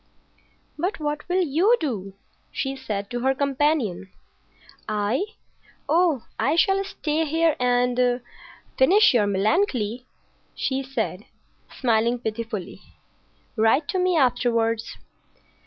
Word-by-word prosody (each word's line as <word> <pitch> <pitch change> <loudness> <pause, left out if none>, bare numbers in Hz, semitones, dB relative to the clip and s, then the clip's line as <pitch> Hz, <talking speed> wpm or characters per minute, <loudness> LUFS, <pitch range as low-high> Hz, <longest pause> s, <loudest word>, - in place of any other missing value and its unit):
"But 370 +5 -2
what 300 +1 -4
will 365 +1 +2
you 350 - +3
do," 205 - -4 0.4
she 270 0 -3
said 210 -7 -5
to 245 - -2
her 265 +2 +1
companion. 275 - 0 0.8
"I? 215 - 0 0.6
Oh, 320 -4 +2 0.2
I 275 +8 +2
shall 390 +3 +3
stay 325 -5 -2
here 320 0 +2
and—finish 250 - +1
your 215 -4 +3
Melancolia," 220 - 0 0.5
she 265 0 -1
said, 230 -7 -4 0.5
smiling 235 -1 +2
pitifully. 220 -4 -5 0.7
"Write 225 +7 +3
to 375 - 0
me 365 -1 +2
afterwards." 230 -4 +1
255 Hz, 105 wpm, -24 LUFS, 225-315 Hz, 0.8 s, you